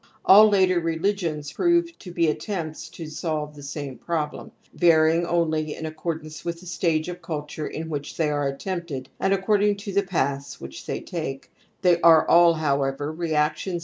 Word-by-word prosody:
All 215 +3 +8
later 185 -3 +3
religions 165 -3 -2
prove 345 -1 +2
to 180 - -10
be 170 -1 +1
attempts 155 0 -3
tp 165 - -8
solve 155 -1 -3
the 145 - -12
same 140 -2 -6
problem, 155 -3 -3 0.2
varying 165 0 +4
only 160 -3 0
in 160 - -6
a 155 - -4
ccordance 155 -1 -5
with 170 -1 -4
the 180 - -14
stage 165 -2 0
of 180 0 -6
culture 150 -2 -5
in 160 +1 -5
which 145 -3 -5
they 155 -2 +1
are 145 -1 0
attempted 150 -2 -5
and 195 - +1
according 205 +1 +2
to" 200 -1 -6
the 200 - +3
paths"^hi^ 140 - -3
they - - -3
take; 145 -6 -6 0.3
they 175 -2 +4
are 165 -2 +6
all, 170 -1 +6
however,"reailti^iS. 150 +4 -1
160 Hz, 165 wpm, -24 LUFS, 150-180 Hz, 0.3 s, All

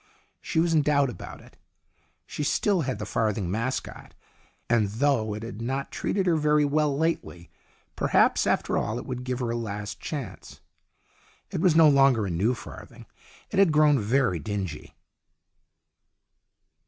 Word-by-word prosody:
She - - -1
was 165 0 +2
in 155 - +4
doubt 140 -2 +2
about 90 - -10
it. - - -19 0.7
She 150 - -5
still 185 +5 +1
had 130 -3 -2
the - - -5
farthing 105 -5 -1
mascot, 115 +5 -4 0.5
and 115 -3 +2
though 110 -2 0
it 105 - -7
had 115 -1 -7
not 135 +3 -3
treated 195 -1 -1
her 170 -3 +2
very 150 -1 +3
well 145 -1 +1
lately, 155 - -3 0.4
perhaps - - +2
after - - +1
all 110 - -2
it - - -6
would 125 -1 -5
give 125 -1 -3
her 120 -2 -1
a - - -2
last 105 -3 -5
chance. 145 -6 -7 0.9
It - - -3
was 180 -4 +3
no 160 -1 +7
longer 135 -6 +4
a 95 - -3
new 100 +9 +1
farthing; - - -11 0.5
it - - 0
had 195 -5 +5
grown 150 -2 +4
very 115 -4 +1
dingy. 95 -2 -5
130 Hz, 155 wpm, -26 LUFS, 110-150 Hz, 0.9 s, no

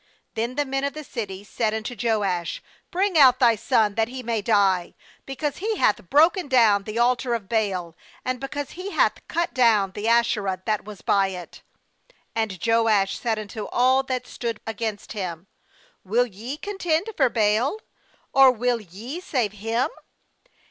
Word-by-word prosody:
30Then 235 +3 -2
the 290 0 0
men 270 0 -2
of 280 - -1
the 305 - -7
city 205 -8 -6
said 215 +1 -1
unto 220 +2 -4
Joash: 200 -8 -1 0.3
'Bring 370 -2 +1
out 255 -3 +7
thy 235 -3 +4
son, 220 -2 +2
that 225 +1 +1
he 255 +1 -7
may 230 -2 -1
die; 195 -5 +2 0.3
because 280 +2 -3
he 430 +2 -2
hath 190 -4 +1
broken 335 +4 +4
down 220 -7 +4
the 215 +1 -5
altar 240 0 +2
of 215 -4 -6
Baal, 190 -7 -1 0.3
and 255 0 -1
because 275 +1 -5
he 365 +3 -6
hath - - +2
cut 340 +1 -1
down 220 -6 +3
the 205 +3 -4
Asherah 215 -5 +1
that 215 -2 -1
was 210 -3 -10
by 195 -1 +3
it.' 180 -2 -8 0.7
31And 215 -6 -2 0.2
Joash 200 -3 +2
said 225 -2 -1
unto 215 0 -6
all 260 +2 +3
that 255 -2 -3
stood 230 -3 -4
against 220 -2 -4
him: 180 -5 -5 0.6
'Will 230 +6 +2
ye 235 +6 -7
contend 385 +1 -1
for 265 -4 +3
Baal? 225 - +1 0.6
or 270 -1 +7
will 245 -1 0
ye 215 - -8
save 255 - -1
him? 225 +4 -1
230 Hz, 165 wpm, -24 LUFS, 205-265 Hz, 0.7 s, out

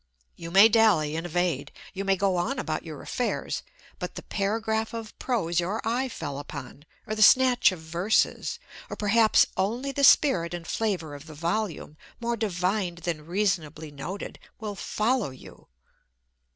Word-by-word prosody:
You 165 - -8
may 195 +5 +8
dally 210 -10 +3
and 165 +2 -3
evade, 170 -5 -1 0.2
you 195 0 -4
may 195 -1 +2
go 195 0 +1
on 215 +10 -1
about - - -3
your - - -8
affairs, - - -2 0.4
but - - -5
the - - -7
paragraph 220 +2 -1
of 225 -2 -6
prose 175 -9 0
your 190 +6 -1
eye 250 +3 0
fell 145 - -5
upon, 145 0 -9 0.2
or 215 - -3
the 215 - -2
snatch 255 +1 +6
of 185 - -6
verses, 170 +6 0 0.3
or - - -5
perhaps 215 +1 +4
only 235 +9 -1
the 280 +1 -2
spirit 180 - +5
and 170 -1 -8
flavour 185 -7 -2
of 145 +2 -10
the 155 - -10
volume, 170 -1 -3 0.2
more 235 0 -1
divined 185 -3 -1
than 160 -3 -3
reasonably 170 -5 -1
noted, 170 +8 -7 0.2
will 215 -2 -4
follow 220 - 0
you. 130 -1 -14
195 Hz, 160 wpm, -27 LUFS, 165-220 Hz, 0.4 s, may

